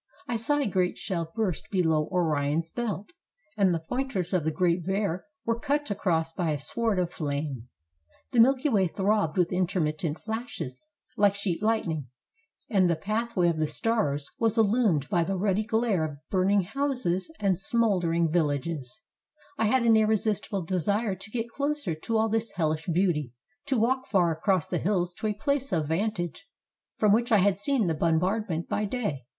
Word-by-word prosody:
I 240 Hz, -, -1 dB
saw 230 Hz, +6 st, +1 dB
a 285 Hz, -, +1 dB
great 185 Hz, -3 st, 0 dB
shell 165 Hz, -3 st, -3 dB
burst 210 Hz, -8 st, -2 dB
below 160 Hz, -5 st, +1 dB
Orion's 160 Hz, -2 st, 0 dB
belt, 215 Hz, -, -4 dB, 0.4 s
and 195 Hz, -3 st, +3 dB
the 165 Hz, -2 st, -1 dB
point 260 Hz, +9 st, -3 dB
ers 180 Hz, -1 st, -2 dB
of 180 Hz, -4 st, +2 dB
the 160 Hz, -, +1 dB
Great 175 Hz, +1 st, +1 dB
Bear 190 Hz, -1 st, -1 dB, 0.2 s
were 230 Hz, 0 st, 0 dB
cut 290 Hz, -1 st, -1 dB
across 165 Hz, -5 st, 0 dB
by 170 Hz, 0 st, -2 dB
a 150 Hz, -, 0 dB
sword 220 Hz, +8 st, -1 dB
of 180 Hz, -1 st, 0 dB
flame. 140 Hz, -5 st, -3 dB, 0.6 s
The 240 Hz, -, +2 dB
Milky 260 Hz, +4 st, +5 dB
Way 200 Hz, -9 st, +3 dB
throbbed 195 Hz, -2 st, 0 dB
with 180 Hz, 0 st, +2 dB
intermittent 165 Hz, -3 st, 0 dB
flashes 220 Hz, -, -5 dB, 0.4 s
like 200 Hz, -1 st, +4 dB
sheet 200 Hz, -4 st, -2 dB
lightning, 175 Hz, -, 0 dB, 0.6 s
and 190 Hz, -4 st, +3 dB
the 170 Hz, -, +2 dB
pathway 215 Hz, +1 st, 0 dB
of 165 Hz, -2 st, 0 dB
the 155 Hz, -, +1 dB
stars 150 Hz, -5 st, 0 dB
was 225 Hz, 0 st, +2 dB
illu 225 Hz, +3 st, +3 dB
mined 150 Hz, -9 st, +2 dB
by 170 Hz, +1 st, +2 dB
the 190 Hz, +3 st, -2 dB
ruddy 200 Hz, +2 st, +1 dB
glare 220 Hz, -6 st, +1 dB
of 150 Hz, -2 st, -4 dB
burning 195 Hz, +1 st, +3 dB
houses 245 Hz, -, -1 dB
and 195 Hz, -4 st, +1 dB
smoul 215 Hz, -2 st, +2 dB
439 170 Hz, 0 st, +1 dB
THE 175 Hz, -, +3 dB
BALKAN 145 Hz, -3 st, +1 dB
STATES 165 Hz, +6 st, -5 dB
dering -, -, 0 dB
villages, 135 Hz, -, -11 dB, 0.6 s
I 225 Hz, -, +3 dB
had 255 Hz, +3 st, +3 dB
an 225 Hz, -1 st, +6 dB
irresistible 215 Hz, -2 st, +1 dB
desire 195 Hz, +5 st, 0 dB
to 195 Hz, +3 st, -9 dB
get 230 Hz, +1 st, -3 dB
closer 285 Hz, -, -2 dB
to 220 Hz, +9 st, -2 dB
all 220 Hz, 0 st, +3 dB
this 225 Hz, 0 st, -1 dB
helhsh 160 Hz, 0 st, -1 dB
beauty, 160 Hz, -8 st, +1 dB, 0.3 s
to 270 Hz, -2 st, +1 dB
walk 260 Hz, +4 st, +1 dB
far 180 Hz, -4 st, +3 dB
across 175 Hz, +1 st, +1 dB
the -, -, -2 dB
hills 180 Hz, -2 st, 0 dB
to 220 Hz, -, -1 dB
a 210 Hz, -, 0 dB
place 275 Hz, +5 st, -1 dB
of 160 Hz, -4 st, 0 dB
vantage 195 Hz, -, -2 dB, 0.5 s
from 210 Hz, -2 st, +4 dB
which 235 Hz, +3 st, +1 dB
I 220 Hz, -, +7 dB
had 200 Hz, 0 st, +3 dB
seen 260 Hz, 0 st, +1 dB
the 165 Hz, -, +1 dB
bombard 180 Hz, +7 st, +1 dB
ment 165 Hz, 0 st, -2 dB
by 210 Hz, -, -1 dB
day. 200 Hz, -, -3 dB
190 Hz, 190 wpm, -27 LUFS, 165-225 Hz, 0.6 s, I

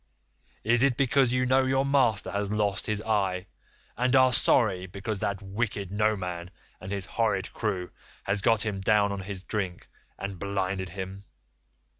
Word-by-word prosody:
Is 120 Hz, +2 st, +3 dB
it 135 Hz, -3 st, +3 dB
because 135 Hz, -1 st, +3 dB
you 125 Hz, 0 st, +2 dB
know 130 Hz, +1 st, +4 dB
your 135 Hz, +1 st, +2 dB
master 135 Hz, -7 st, +2 dB
has 100 Hz, 0 st, -2 dB
lost 105 Hz, -2 st, 0 dB
his 105 Hz, 0 st, -1 dB
eye, 95 Hz, -4 st, 0 dB, 0.5 s
and 125 Hz, +2 st, +2 dB
are 130 Hz, -1 st, +6 dB
sorry 95 Hz, -7 st, +3 dB
because 100 Hz, +3 st, -4 dB
that 100 Hz, -1 st, -2 dB
wicked 100 Hz, -1 st, -3 dB
Noman 95 Hz, -5 st, -1 dB, 0.3 s
and 95 Hz, -, -8 dB
his 100 Hz, -2 st, -2 dB
horrid 105 Hz, -3 st, -1 dB
crew 95 Hz, -5 st, -2 dB, 0.3 s
has 100 Hz, +1 st, -1 dB
got 115 Hz, +1 st, +3 dB
him 105 Hz, -3 st, -2 dB
down 100 Hz, 0 st, +3 dB
in 100 Hz, -, -3 dB
his 95 Hz, -1 st, -6 dB
drink 95 Hz, -5 st, -3 dB, 0.3 s
and 100 Hz, -2 st, -5 dB
blinded 95 Hz, -1 st, -2 dB
him? 95 Hz, +2 st, -7 dB
100 Hz, 160 wpm, -28 LUFS, 95-115 Hz, 0.5 s, are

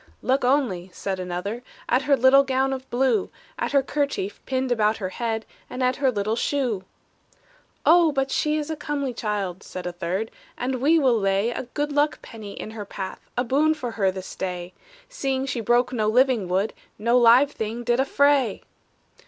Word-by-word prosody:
"Look 265 Hz, +1 st, +1 dB
only," 245 Hz, -9 st, +1 dB
said 190 Hz, 0 st, -3 dB
another, 185 Hz, +6 st, -4 dB, 0.3 s
"At 250 Hz, -, +3 dB
her 280 Hz, -, +6 dB
little 260 Hz, +2 st, +6 dB
gown 270 Hz, 0 st, 0 dB
of 260 Hz, 0 st, -7 dB
blue; 265 Hz, -, +1 dB, 0.3 s
At -, -, -1 dB
her 280 Hz, -1 st, +3 dB
kerchief 280 Hz, -9 st, -2 dB
pinned 260 Hz, -1 st, -1 dB
about 220 Hz, -2 st, +2 dB
her 190 Hz, -3 st, -3 dB
head, 225 Hz, +1 st, -3 dB, 0.2 s
And 255 Hz, +1 st, -3 dB
at 255 Hz, 0 st, +1 dB
her 275 Hz, -2 st, +2 dB
little 215 Hz, -1 st, -1 dB
shoe!" 240 Hz, -7 st, -1 dB, 1.0 s
"Oh, 335 Hz, -1 st, +6 dB
but 270 Hz, -1 st, -1 dB
she 305 Hz, 0 st, +1 dB
is 305 Hz, +1 st, -3 dB
a -, -, -2 dB
comely 285 Hz, -4 st, -3 dB
child," 205 Hz, -5 st, -3 dB
Said 185 Hz, -, -8 dB
a 180 Hz, -, -2 dB
third; 185 Hz, +5 st, -3 dB, 0.3 s
"and 255 Hz, 0 st, -2 dB
we 315 Hz, +5 st, +5 dB
will 255 Hz, -7 st, +3 dB
lay 195 Hz, +3 st, +1 dB
A 240 Hz, -, -5 dB
good 295 Hz, 0 st, -1 dB
luck 295 Hz, +1 st, +1 dB
penny 215 Hz, -4 st, -9 dB
in 215 Hz, -, -7 dB
her 220 Hz, -2 st, -6 dB
path, 195 Hz, -2 st, -6 dB, 0.2 s
A 245 Hz, -, +2 dB
boon 295 Hz, +5 st, +2 dB
for 250 Hz, -6 st, -4 dB
her 200 Hz, -4 st, +1 dB
this 190 Hz, 0 st, -6 dB
day, 180 Hz, -1 st, -4 dB, 0.3 s
Seeing 270 Hz, -, -2 dB
she 260 Hz, -3 st, -3 dB
broke 240 Hz, +2 st, +2 dB
no 215 Hz, -3 st, 0 dB
living 245 Hz, -3 st, +3 dB
wood; 190 Hz, +4 st, 0 dB, 0.2 s
No 235 Hz, +3 st, +1 dB
live 245 Hz, +4 st, +6 dB
thing 225 Hz, 0 st, -4 dB
did 240 Hz, +1 st, +1 dB
affray!" 275 Hz, -4 st, +2 dB
245 Hz, 185 wpm, -24 LUFS, 210-270 Hz, 1.0 s, her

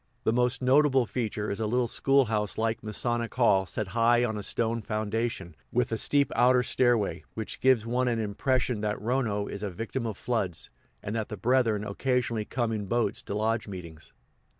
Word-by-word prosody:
The 110 Hz, -, +2 dB
most 125 Hz, +2 st, +1 dB
notable 135 Hz, -1 st, +4 dB
feature 110 Hz, -3 st, -3 dB
is 100 Hz, -, -4 dB
a 110 Hz, -, 0 dB
little 125 Hz, +2 st, +1 dB
school 135 Hz, +3 st, +3 dB
house 105 Hz, -2 st, -2 dB
like 110 Hz, 0 st, -1 dB
Masonic 115 Hz, +2 st, -2 dB
hall 100 Hz, -7 st, +3 dB
set 105 Hz, -1 st, -4 dB
high 120 Hz, +2 st, +3 dB
on 110 Hz, -2 st, -2 dB
a 105 Hz, -, -4 dB
stone 115 Hz, +2 st, -1 dB
foundation, 110 Hz, -4 st, -3 dB, 0.2 s
with 120 Hz, -1 st, 0 dB
a -, -, +1 dB
steep 140 Hz, -1 st, +3 dB
outer 125 Hz, 0 st, +4 dB
stairway 120 Hz, -5 st, +1 dB
which 110 Hz, -1 st, -5 dB
gives 130 Hz, -4 st, +3 dB
one 125 Hz, +2 st, 0 dB
an 120 Hz, -2 st, +1 dB
impression 115 Hz, +2 st, 0 dB
that 105 Hz, 0 st, -1 dB
Rono 110 Hz, -3 st, 0 dB
is 100 Hz, -, -6 dB
a 105 Hz, -, -2 dB
victim 115 Hz, +6 st, -4 dB
of 105 Hz, -3 st, -5 dB
floods, 105 Hz, -9 st, -2 dB, 0.3 s
and 105 Hz, -, -4 dB
that 110 Hz, -2 st, -2 dB
the 105 Hz, -, -5 dB
brethren 115 Hz, -1 st, +2 dB
occasionally 115 Hz, 0 st, -1 dB
come 120 Hz, -1 st, -1 dB
in 105 Hz, -3 st, -3 dB
boats 120 Hz, -1 st, 0 dB
to 100 Hz, -, -5 dB
lodge 110 Hz, +1 st, 0 dB
meetings. 85 Hz, -5 st, -9 dB
115 Hz, 190 wpm, -28 LUFS, 105-125 Hz, 0.3 s, notable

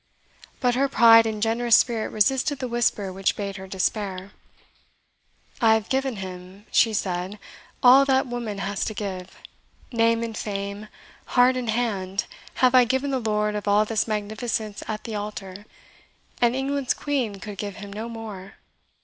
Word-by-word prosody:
But 245 Hz, -1 st, +2 dB
her 275 Hz, +3 st, +1 dB
pride 230 Hz, -3 st, +7 dB
and 215 Hz, -1 st, -2 dB
generous 230 Hz, 0 st, +3 dB
spirit 230 Hz, -3 st, +2 dB
resisted 270 Hz, +6 st, +1 dB
the 255 Hz, -, -4 dB
whisper 235 Hz, -5 st, 0 dB
which 195 Hz, +1 st, 0 dB
bade 200 Hz, -1 st, -4 dB
her 190 Hz, 0 st, -9 dB
despair. 195 Hz, 0 st, -2 dB, 1.3 s
"I 220 Hz, -1 st, +6 dB
have 220 Hz, -1 st, -3 dB
given 265 Hz, -2 st, 0 dB
him," 185 Hz, +1 st, -9 dB
she 230 Hz, -, +4 dB
said, 190 Hz, -1 st, -2 dB, 0.5 s
"all 260 Hz, +2 st, +8 dB
that 265 Hz, 0 st, +2 dB
woman 240 Hz, -4 st, -4 dB
has 195 Hz, 0 st, -2 dB
to 215 Hz, -, -4 dB
give. 190 Hz, -3 st, -6 dB, 0.5 s
Name 230 Hz, -1 st, +2 dB
and 225 Hz, -1 st, -5 dB
fame, 200 Hz, 0 st, -5 dB, 0.5 s
heart 250 Hz, +1 st, +6 dB
and 250 Hz, -2 st, -3 dB
hand, 205 Hz, -4 st, -1 dB, 0.3 s
have 255 Hz, -1 st, +3 dB
I 255 Hz, -1 st, +7 dB
given 265 Hz, +3 st, 0 dB
the 265 Hz, -, 0 dB
lord 210 Hz, -2 st, 0 dB
of 210 Hz, 0 st, -4 dB
all 205 Hz, +1 st, +4 dB
this 220 Hz, 0 st, -1 dB
magnificence 215 Hz, 0 st, -3 dB
at 215 Hz, -1 st, -4 dB
the 225 Hz, -, -6 dB
altar, 205 Hz, -1 st, -6 dB, 0.7 s
and 240 Hz, 0 st, +3 dB
England's 270 Hz, 0 st, -1 dB
Queen 265 Hz, -8 st, -2 dB
could 200 Hz, +1 st, -9 dB
give 205 Hz, -2 st, -4 dB
him 200 Hz, 0 st, -9 dB
no 220 Hz, +3 st, -5 dB
more. 210 Hz, -4 st, -8 dB
215 Hz, 160 wpm, -24 LUFS, 200-240 Hz, 1.3 s, all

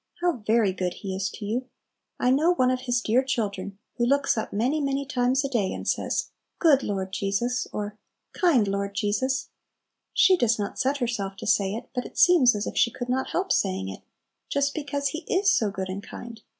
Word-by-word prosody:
How 350 Hz, -5 st, +1 dB
very 215 Hz, -2 st, +2 dB
good 180 Hz, -1 st, -2 dB
He 190 Hz, -2 st, -5 dB
is 190 Hz, +1 st, -1 dB
to 210 Hz, -, -8 dB
you! 245 Hz, +5 st, -2 dB, 0.5 s
I 250 Hz, -, +3 dB
know 320 Hz, +7 st, +3 dB
one 255 Hz, -5 st, +3 dB
of 255 Hz, 0 st, -1 dB
His 245 Hz, 0 st, +2 dB
dear 235 Hz, +3 st, +3 dB
children 200 Hz, -6 st, -3 dB, 0.2 s
who 240 Hz, -, +1 dB
looks 280 Hz, +1 st, +2 dB
up 220 Hz, -, -3 dB
many, 255 Hz, +9 st, 0 dB
many 275 Hz, 0 st, -1 dB
times 260 Hz, +1 st, +1 dB
a -, -, +1 dB
day, 230 Hz, -8 st, 0 dB
and -, -, -6 dB
says, -, -, -1 dB, 0.3 s
"Good 295 Hz, -5 st, +5 dB
Lord 190 Hz, -3 st, -3 dB
Jesus!" 205 Hz, +6 st, -1 dB
or 210 Hz, 0 st, -5 dB, 0.3 s
"Kind 290 Hz, -, +3 dB
Lord 200 Hz, 0 st, -2 dB
Jesus!" 215 Hz, +7 st, 0 dB, 0.6 s
She 380 Hz, -, +5 dB
does 235 Hz, -6 st, +2 dB
not 205 Hz, -1 st, -4 dB
set 270 Hz, +2 st, +1 dB
herself 230 Hz, -7 st, -2 dB
to -, -, -8 dB
say 200 Hz, -1 st, +2 dB
it, 235 Hz, +2 st, -7 dB
but 250 Hz, -1 st, -3 dB
it -, -, -17 dB
seems 280 Hz, -10 st, +6 dB
as 205 Hz, -, -2 dB
if -, -, -5 dB
she -, -, +4 dB
could 245 Hz, +1 st, -6 dB
not 260 Hz, +1 st, 0 dB
help 380 Hz, +2 st, -1 dB
saying 95 Hz, 0 st, 0 dB
it, 95 Hz, -, -8 dB, 0.5 s
just 280 Hz, 0 st, +1 dB
because 285 Hz, -2 st, -2 dB
He 310 Hz, -, -4 dB
is 390 Hz, +2 st, +4 dB
so 215 Hz, -, +2 dB
good 190 Hz, -1 st, -4 dB
and 190 Hz, +2 st, -5 dB
kind. 225 Hz, +1 st, -10 dB
240 Hz, 210 wpm, -26 LUFS, 200-275 Hz, 0.6 s, seems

